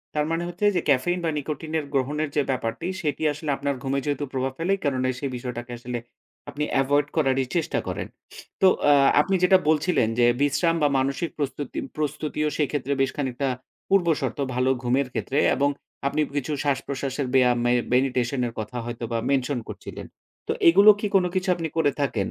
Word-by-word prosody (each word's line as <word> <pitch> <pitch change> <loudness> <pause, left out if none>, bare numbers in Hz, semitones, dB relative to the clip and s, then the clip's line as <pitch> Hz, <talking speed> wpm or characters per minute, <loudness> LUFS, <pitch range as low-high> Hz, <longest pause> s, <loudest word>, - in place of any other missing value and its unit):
তারমানে 165 +3 0
হচ্ছে 180 +4 -2
যে, 175 - +2
ক্যাফেইন 145 +7 +2
বা 165 - +1
নিকোটিনের 155 +1 -3
গ্রহণের 145 +3 0
যে 145 - +4
ব্যাপারটি, 125 +5 -3
সেটি 155 0 -2
আসলে 150 +1 -6
আপনার 140 0 -1
ঘুমে 135 0 0
যেহেতু 145 0 -1
প্রভাব 130 0 -1
ফেলে, 170 +4 -1
এই 195 - -13
কারনে 130 -3 0
সেই 140 0 -3
বিষয়টাকে 120 0 -6
আসলে 120 0 -4 0.5
আপনি 150 - -3 0.2
এভয়েড 145 +1 +2
করারই 135 -4 +2
চেষ্টা 165 - 0
করেন। - - -3 0.5
তো, 190 - +7 0.2
আ - - +8 0.3
আপনি 190 +5 0
যেটা 190 +1 +7
বলছিলেন 155 -5 +2
যে, 120 - +6 0.2
বিশ্রাম 165 +4 +2
বা 145 - +6
মানসিক 140 +5 -1
প্রস্তুতি 145 -1 -3 0.2
প্রস্তুতিও 150 0 -2
সেক্ষেত্রে 145 -2 -1
বেশ 135 0 +1
খানিকটা 135 -1 -2 0.4
পূর্বশর্ত, 170 -7 +1 0.2
ভালো 125 +1 +2
ঘুমের 130 +2 +1
ক্ষেত্রে 140 - -2 0.2
এবং 140 +1 +2 0.4
আপনি 145 +2 0
কিছু 145 +2 -1
শ্বাসপ্রশ্বাসের 135 -1 -2
ব্যয়াম 125 -2 +4
মে 120 - +3 0.2
মেডিটেশন 125 0 +1
এর 115 - -7
কথা 110 +3 -5
হয়তোবা 115 -1 -4
মেনশন 135 -1 +1
করছিলেন। - - -8 0.4
তো, - - 0 0.2
এগুলো 200 +5 +7
কি 210 - -1
কোনো 185 -2 +4
কিছু 185 0 0
আপনি 165 -1 -3
করে 145 -3 +3
থাকেন, 110 -8 0
140 Hz, 170 wpm, -24 LUFS, 130-155 Hz, 0.5 s, আ